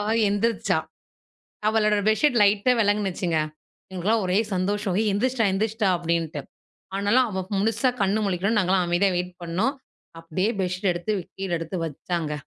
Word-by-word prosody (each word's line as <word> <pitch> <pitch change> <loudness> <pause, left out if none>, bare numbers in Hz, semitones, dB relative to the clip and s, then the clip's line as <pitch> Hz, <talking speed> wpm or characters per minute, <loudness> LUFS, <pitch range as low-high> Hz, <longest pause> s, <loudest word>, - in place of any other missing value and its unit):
அவ 205 - -2 0.2
எந்திரிச்சா. 215 +2 +1 0.9
அவளோட 215 -1 +2
பெட்ஷீட் 240 +3 +3
லைட்டா 205 +4 +3
வெலங்கினுச்சுங்க. 195 -5 0 0.6
எங்களுக்குல்லாம் 205 +4 0
ஒரே 180 +2 +2 0.2
சந்தோஷம். 200 +1 -1
"ஏய் 220 -1 +1
எந்திரிச்சுட்டா 235 +2 +1
எந்திரிச்சிட்டா", 215 +1 0
அப்டின்ட்டு. 165 -3 -2 0.6
ஆனாலும் 205 +6 +3
அவ 190 -2 -3
முழுசா 225 +5 +2
கண் 195 +2 +2
முழிக்கணும்னு 200 +3 +1
நாங்கலாம் 185 -1 +2
அமைதியா 175 +3 +2
வெயிட் 180 0 -3
பண்ணோம். 190 +11 0 0.5
அப்டியே 185 +6 -1
பெட்ஷீட் 185 +1 0
எடுத்து 175 +5 -2 0.2
கீழ 195 -1 -4
எடுத்து 165 +2 -4
வச்சாங்க. 160 +1 -3
195 Hz, 135 wpm, -24 LUFS, 180-215 Hz, 0.9 s, பெட்ஷீட்